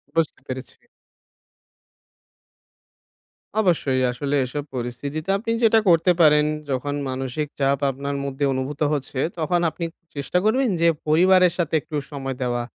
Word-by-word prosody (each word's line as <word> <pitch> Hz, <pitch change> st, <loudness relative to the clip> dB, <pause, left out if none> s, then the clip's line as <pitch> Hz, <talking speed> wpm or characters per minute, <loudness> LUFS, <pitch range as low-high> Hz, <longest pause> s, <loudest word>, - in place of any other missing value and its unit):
বুঝতে 165 Hz, -2 st, 0 dB
পেরেছি। 130 Hz, 0 st, -7 dB, 2.8 s
অবশ্যই 165 Hz, -10 st, +2 dB
আসলে 140 Hz, +3 st, -2 dB
এসব 145 Hz, +3 st, -4 dB
পরিস্থিতিতে 140 Hz, +7 st, -4 dB
আপনি 230 Hz, +2 st, -3 dB
যেটা 225 Hz, 0 st, +6 dB
করতে 170 Hz, +1 st, +5 dB
পারেন। 150 Hz, -1 st, +6 dB, 0.2 s
যখন 140 Hz, +2 st, -1 dB, 0.2 s
মানসিক 130 Hz, +3 st, -3 dB
চাপ 140 Hz, 0 st, +2 dB
আপনার 140 Hz, +2 st, -4 dB
মধ্যে 140 Hz, +1 st, -1 dB
অনুভূত 130 Hz, +3 st, -4 dB
হচ্ছে 135 Hz, -2 st, -3 dB, 0.2 s
তখন 175 Hz, +2 st, +1 dB
আপনি 170 Hz, +1 st, -5 dB, 0.3 s
চেষ্টা 140 Hz, +5 st, -1 dB
করবেন 250 Hz, +4 st, +3 dB
যে 170 Hz, -, +5 dB, 0.2 s
পরিবারের 180 Hz, +3 st, +5 dB
সাথে 170 Hz, -3 st, -1 dB
একটু 155 Hz, 0 st, -8 dB, 0.2 s
সময় 135 Hz, -2 st, -4 dB
দেওয়া। 120 Hz, -1 st, -1 dB
145 Hz, 125 wpm, -23 LUFS, 135-170 Hz, 2.8 s, যেটা